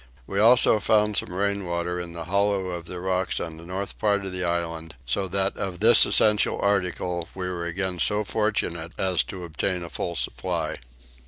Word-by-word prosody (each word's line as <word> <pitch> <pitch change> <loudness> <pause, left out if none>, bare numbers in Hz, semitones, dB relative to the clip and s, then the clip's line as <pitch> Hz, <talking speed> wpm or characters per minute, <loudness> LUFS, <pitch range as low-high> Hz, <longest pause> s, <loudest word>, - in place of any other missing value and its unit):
We 95 - -2
also 115 0 +6
found 105 0 +2
some 90 - -1
rainwater 90 -3 -1
in 85 -1 -7
the 85 -1 -5
hollow 100 +1 +1
of 85 -2 -5
the 90 0 -6
rocks 95 0 -1
on 80 -2 -5
the 80 - -11
north 95 +2 -5
part 100 -2 +1
of 95 - -3
the 90 0 -2
island, 85 -2 -3
so 95 +11 -1
that 95 +1 0
of 90 -3 -4
this - - +7
essential 105 -1 +3
article 90 -3 -1
we 90 -1 -3
were 85 -2 -3
again 90 +1 -3
so 105 +3 +2
fortunate 95 -6 -1
as 95 -2 +1
to 95 -2 -7
obtain 85 +2 -2
a 85 - -7
full 85 - -3
supply. - - -2
90 Hz, 185 wpm, -25 LUFS, 85-100 Hz, -, this